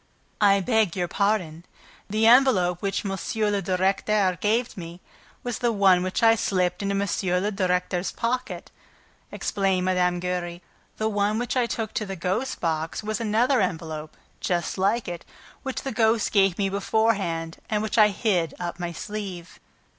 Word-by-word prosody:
"I 200 Hz, -1 st, +5 dB
beg 220 Hz, -3 st, +1 dB
your 180 Hz, -2 st, -1 dB
pardon. 180 Hz, -5 st, -1 dB, 0.5 s
The 215 Hz, +2 st, +1 dB
envelope 225 Hz, -8 st, +5 dB
which 195 Hz, +1 st, -2 dB
M. 195 Hz, -, -2 dB, 0.4 s
le 200 Hz, -1 st, 0 dB
Directeur 190 Hz, +1 st, +1 dB
gave 225 Hz, +3 st, +1 dB
me 170 Hz, -1 st, -8 dB, 0.4 s
was 245 Hz, -2 st, -3 dB
the 240 Hz, -2 st, +1 dB
one 195 Hz, -4 st, +4 dB
which 185 Hz, +4 st, -2 dB
I 225 Hz, 0 st, +7 dB
slipped 180 Hz, -4 st, 0 dB
into 200 Hz, 0 st, -1 dB
M. 190 Hz, -2 st, 0 dB
le 210 Hz, -, 0 dB
Directeur's 180 Hz, -2 st, 0 dB
pocket," 250 Hz, +2 st, -3 dB, 0.6 s
explained 190 Hz, -2 st, 0 dB
Mme. 180 Hz, -1 st, +2 dB
Giry. 175 Hz, -1 st, -3 dB, 0.3 s
"The 220 Hz, -, 0 dB
one 205 Hz, 0 st, 0 dB
which 245 Hz, +2 st, -2 dB
I 250 Hz, -2 st, +2 dB
took 220 Hz, -2 st, -3 dB
to 215 Hz, -, -2 dB
the 195 Hz, -, -4 dB
ghost's 185 Hz, +9 st, -2 dB
box 160 Hz, +3 st, -2 dB
was 215 Hz, +1 st, -2 dB
another 230 Hz, +4 st, +2 dB
envelope, 160 Hz, -2 st, -4 dB, 0.2 s
just 175 Hz, +1 st, -2 dB
like 210 Hz, +5 st, +1 dB
it, 175 Hz, -1 st, -5 dB, 0.4 s
which 265 Hz, -2 st, -4 dB
the 270 Hz, -, -3 dB
ghost 220 Hz, -1 st, +2 dB
gave 195 Hz, -3 st, +3 dB
me 200 Hz, -, +1 dB
beforehand 195 Hz, -5 st, 0 dB
and 210 Hz, -1 st, 0 dB
which 220 Hz, +1 st, 0 dB
I 210 Hz, -, +8 dB
hid 190 Hz, -5 st, 0 dB
up 175 Hz, 0 st, -4 dB
my 175 Hz, -1 st, -3 dB
sleeve." 195 Hz, -3 st, -7 dB
195 Hz, 160 wpm, -25 LUFS, 180-220 Hz, 0.6 s, I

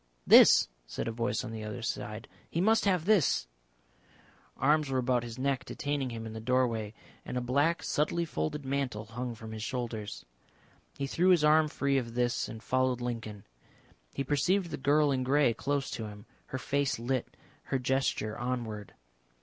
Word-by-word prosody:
"This," -, -, +8 dB, 0.2 s
said -, -, -4 dB
a -, -, -1 dB
voice 115 Hz, 0 st, -1 dB
on -, -, -6 dB
the 110 Hz, -1 st, -6 dB
other 110 Hz, +2 st, -6 dB
side, 115 Hz, 0 st, -4 dB, 0.2 s
"he 165 Hz, -, -2 dB
must 220 Hz, +5 st, +3 dB
have 180 Hz, -5 st, +2 dB
this." 185 Hz, -, +3 dB, 1.1 s
Arms 150 Hz, +1 st, +2 dB
were 130 Hz, -, 0 dB
about 125 Hz, -1 st, +2 dB
his 120 Hz, 0 st, -7 dB
neck 135 Hz, 0 st, 0 dB
detaining 145 Hz, -3 st, -2 dB
him 115 Hz, -1 st, -6 dB
in 110 Hz, -, -6 dB
the 110 Hz, -, -6 dB
doorway, 115 Hz, -3 st, 0 dB, 0.3 s
and 125 Hz, -, -5 dB
a -, -, +2 dB
black 140 Hz, +7 st, +1 dB
subtly 170 Hz, +3 st, 0 dB
folding 150 Hz, -3 st, -3 dB
mantle 130 Hz, -6 st, -2 dB
hung 120 Hz, +2 st, -5 dB
from 110 Hz, 0 st, -9 dB
his 110 Hz, -1 st, -6 dB
shoulders. 115 Hz, -3 st, -4 dB, 0.7 s
He 140 Hz, -, -2 dB
threw 175 Hz, +6 st, +2 dB
his 175 Hz, -4 st, +5 dB
arm 155 Hz, +1 st, +5 dB
free 140 Hz, -2 st, +1 dB
of 115 Hz, -2 st, -7 dB
this 120 Hz, -1 st, 0 dB
and 110 Hz, 0 st, -9 dB
followed 130 Hz, 0 st, +1 dB
Lincoln. 115 Hz, -4 st, -5 dB, 0.7 s
He 135 Hz, -, -1 dB
perceived 170 Hz, +6 st, +1 dB
the -, -, -3 dB
girl 145 Hz, +2 st, +3 dB
in 130 Hz, -1 st, 0 dB
grey 135 Hz, -1 st, +3 dB
close 140 Hz, +3 st, -2 dB
to 110 Hz, -, -4 dB
him, 105 Hz, 0 st, -11 dB, 0.2 s
her 130 Hz, -, -4 dB
face 140 Hz, +2 st, 0 dB
lit, 120 Hz, +2 st, -3 dB, 0.3 s
her 135 Hz, -, 0 dB
gesture 130 Hz, -4 st, 0 dB
onward. 120 Hz, -4 st, -4 dB
130 Hz, 175 wpm, -30 LUFS, 115-145 Hz, 1.1 s, This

